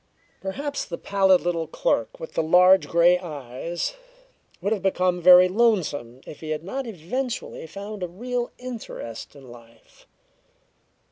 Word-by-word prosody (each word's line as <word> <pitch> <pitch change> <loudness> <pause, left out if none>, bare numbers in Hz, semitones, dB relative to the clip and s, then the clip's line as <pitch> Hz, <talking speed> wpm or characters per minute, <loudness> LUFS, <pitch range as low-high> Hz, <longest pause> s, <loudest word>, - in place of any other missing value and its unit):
Perhaps 280 +10 -4
the 170 - -6
pallid 190 -2 +3
little 170 -2 -1
clerk 115 -7 -1
with 160 - -8
the - - +1
large 180 +4 +5
grey 175 +1 +4
eyes 155 - -5 0.7
would 200 - 0
have 205 - -3
become 180 -2 +1
very 180 +1 +8
lonesome 180 - 0
if - - -10
he 155 - -8
had 155 0 -3
not 260 +8 -4
eventually 225 +1 -4
found 200 +3 -8
a 180 - -2
real 240 +7 -3
interest 230 - -8
in 135 -2 -14
life. 115 -1 -18
180 Hz, 140 wpm, -24 LUFS, 160-205 Hz, 0.7 s, very